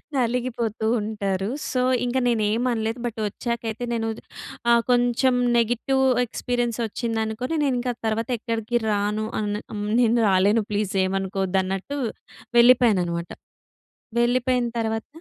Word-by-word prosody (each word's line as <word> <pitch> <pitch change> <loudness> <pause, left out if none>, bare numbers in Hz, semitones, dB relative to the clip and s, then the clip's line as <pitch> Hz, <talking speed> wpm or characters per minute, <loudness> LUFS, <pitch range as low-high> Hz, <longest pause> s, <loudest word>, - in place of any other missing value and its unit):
నలిగిపోతూ 240 -3 -1 0.2
ఉంటారు. 200 -2 -2 0.2
సో, 255 - +1 0.2
ఇంక 245 +1 -1
నేనెం 225 0 +1
అనలేదు. 225 +1 -2
బట్ 235 -2 -4
ఒచ్చాకైతే 230 +1 -4
నేను 225 -1 -1 0.6
ఆహ్, 235 0 +5
కొంచెం 245 +1 +3 0.2
నెగిటివ్ 245 +3 +1 0.2
ఎక్స్పీరియన్స్ 240 0 -2
ఒచ్చిందనుకోని 225 +5 -2
నేను 270 -3 +1
ఇంకా 245 0 -1
తర్వాత 220 +2 -1
ఎక్కడికి 230 +1 -1
రాను 210 +1 0
అని 210 0 -2
హ్మ్. 205 0 -3
నేను 235 0 +3
రాలేను 200 +4 +3
ప్లీజ్ 205 -1 -1
ఏమనుకోవద్దు 190 0 -1
అన్నట్టు 195 +9 -4 0.6
వెళ్ళిపోయాననమాట. 205 -9 +4 0.9
వెళ్ళిపోయిన 245 0 +2
తర్వాత 225 0 -2
225 Hz, 115 wpm, -24 LUFS, 210-245 Hz, 0.9 s, ఆహ్